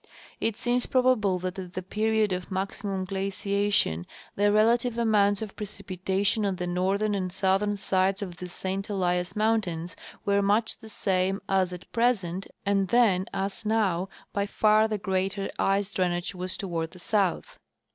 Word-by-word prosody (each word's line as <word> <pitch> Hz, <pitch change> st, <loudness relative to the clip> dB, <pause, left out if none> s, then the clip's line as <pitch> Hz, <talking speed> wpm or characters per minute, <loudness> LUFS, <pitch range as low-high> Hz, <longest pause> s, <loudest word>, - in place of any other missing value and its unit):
It 225 Hz, -1 st, -1 dB
seems 245 Hz, 0 st, 0 dB
probable 250 Hz, -7 st, +3 dB
that 185 Hz, +1 st, -4 dB
at 180 Hz, -1 st, -7 dB
the 185 Hz, -, -3 dB
period 215 Hz, +1 st, +1 dB
of 180 Hz, 0 st, -4 dB
maximum 195 Hz, 0 st, -2 dB
giaciation 195 Hz, -, 0 dB, 0.3 s
the 205 Hz, +1 st, +3 dB
relative 230 Hz, +3 st, +3 dB
amounts 210 Hz, -3 st, +3 dB
of 210 Hz, -, -8 dB
precipitation 195 Hz, 0 st, -1 dB
on 195 Hz, -2 st, 0 dB
the 180 Hz, -, -3 dB
northern 190 Hz, +4 st, 0 dB
and 185 Hz, -2 st, -2 dB
southern 195 Hz, +2 st, +2 dB
sides 195 Hz, 0 st, +1 dB
of 180 Hz, -3 st, -7 dB
the 180 Hz, -, -6 dB
St 190 Hz, +3 st, -4 dB
Elias 180 Hz, -3 st, 0 dB
mountains 195 Hz, -6 st, 0 dB, 0.3 s
were 200 Hz, 0 st, +3 dB
much 210 Hz, +3 st, +1 dB
the 220 Hz, -, -12 dB
same 190 Hz, -1 st, 0 dB
as 190 Hz, -2 st, +2 dB
at 180 Hz, -1 st, -8 dB
present, 195 Hz, -6 st, 0 dB, 0.2 s
and 195 Hz, -1 st, +2 dB
then 195 Hz, -4 st, +3 dB
as 195 Hz, +2 st, -3 dB
now 200 Hz, -4 st, +1 dB, 0.2 s
by 200 Hz, 0 st, 0 dB
far 215 Hz, +1 st, +4 dB
the 215 Hz, -1 st, -1 dB
greater 195 Hz, 0 st, -1 dB
ice 195 Hz, +1 st, +1 dB
drainage 175 Hz, 0 st, 0 dB
was 185 Hz, 0 st, -3 dB
toAvard 165 Hz, -4 st, -3 dB
the -, -, -12 dB
south. 205 Hz, -, 0 dB
195 Hz, 155 wpm, -27 LUFS, 185-210 Hz, 0.3 s, far